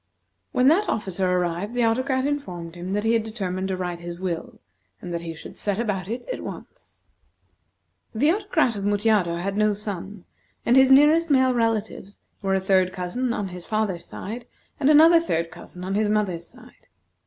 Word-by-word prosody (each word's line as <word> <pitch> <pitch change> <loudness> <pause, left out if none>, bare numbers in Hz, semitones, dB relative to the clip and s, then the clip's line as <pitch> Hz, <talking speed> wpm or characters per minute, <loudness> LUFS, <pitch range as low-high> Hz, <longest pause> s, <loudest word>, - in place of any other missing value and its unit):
When 250 +1 +3
that 385 +7 +3
officer 190 -3 -1
arrived, 180 +4 -1
the 245 - +2
Autocrat 260 +3 +1
informed 180 - -4
him 180 +2 -5
that 205 +1 0
he 225 +1 +2
had 230 - +3
determined 190 -4 -4
to 190 -1 -2
write 175 -2 -4
his 175 0 -7
will, 175 -3 -4 0.4
and 175 - -7
that 170 - -2
he 165 -1 -6
should - - -11
set 200 -2 -1
about 205 -5 -2
it 235 - -5
at - - -6
once. - - -10 1.1
The 295 +8 +3
Autocrat 360 - +1
of 200 - -4
Mutjado 205 -4 +2
had 195 +3 -3
no 215 0 +3
son, 200 -2 -6 0.4
and 240 - +4
his 265 0 +6
nearest 300 +5 +6
male 260 -2 +4
relatives 220 -4 -2 0.2
were 195 -1 +1
a - - +2
third 185 -1 +2
cousin 190 +8 -2
on 205 -4 -2
his 180 -1 -9
father's 215 -5 -1
side, 230 +4 -7 0.3
and 285 -1 +3
another 320 +3 +7
third 170 - -2
cousin 180 - -11
on 190 +1 -3
his 210 +1 +1
mother's 190 -5 -1
side. - - -17
205 Hz, 185 wpm, -24 LUFS, 180-245 Hz, 1.1 s, another